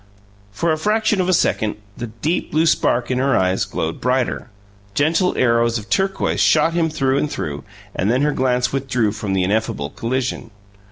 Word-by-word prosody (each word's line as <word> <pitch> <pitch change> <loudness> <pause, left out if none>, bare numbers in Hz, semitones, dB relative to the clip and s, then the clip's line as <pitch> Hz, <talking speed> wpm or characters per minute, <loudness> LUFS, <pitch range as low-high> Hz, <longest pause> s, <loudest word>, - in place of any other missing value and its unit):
For 135 +11 0
the 155 - +1
fraction 210 +2 +1
of 180 - -1
a - - +4
second, 110 -9 +1 0.2
the 120 - -5
deep 115 +10 -2
blue 160 +2 +2
spark 125 -6 +1
in 125 - 0
her 135 -1 +2
eyes 95 0 +1
glowed 80 0 -4
brighter 125 -1 -1 0.5
gentle 165 - +2
arrows 115 -1 +2
of 110 0 -9
turquoise 195 0 0
shot 160 +1 +4
him 165 -1 +1
through 135 -3 0
and 150 - -2
through 75 -6 -4 0.3
and 95 - 0
then 125 +4 +2
her 150 0 +2
glance 125 -1 0
withdrew 125 -5 0
from 105 -2 -4
the 95 -1 +1
ineffable 90 -8 -1
collision. 120 0 -3
125 Hz, 180 wpm, -20 LUFS, 110-155 Hz, 0.5 s, a